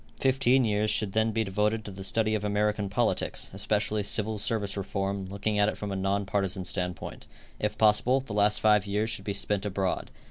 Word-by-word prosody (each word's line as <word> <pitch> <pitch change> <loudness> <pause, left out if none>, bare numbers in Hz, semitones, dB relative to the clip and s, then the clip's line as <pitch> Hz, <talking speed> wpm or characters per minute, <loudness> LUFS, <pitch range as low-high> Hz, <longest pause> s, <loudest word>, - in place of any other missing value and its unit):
Fifteen 130 -1 +3
years 105 0 +1
should 105 -2 +1
then 110 0 +2
be 110 +1 0
devoted 105 +2 -1
to 105 - -6
the 95 0 -8
study 110 +2 +1
of 105 -1 -1
American 105 0 0
politics, 115 +4 0
especially 105 +1 0
civil 105 +1 0
service 105 -2 -1
reform, 100 0 -3
looking 105 +2 -1
at 105 +1 +4
it - - -5
from 105 -1 -5
a - - -2
non 100 +1 0
partisan 95 -1 -2
standpoint. 90 -3 -3 0.3
If - - -2
possible, 110 +5 +4
the 130 -6 -7
last 105 0 +3
five 105 -2 +4
years 105 +3 0
should 100 -3 -5
be 100 - -2
spent 100 0 0
abroad. 95 -2 -2
105 Hz, 200 wpm, -28 LUFS, 100-110 Hz, 0.3 s, at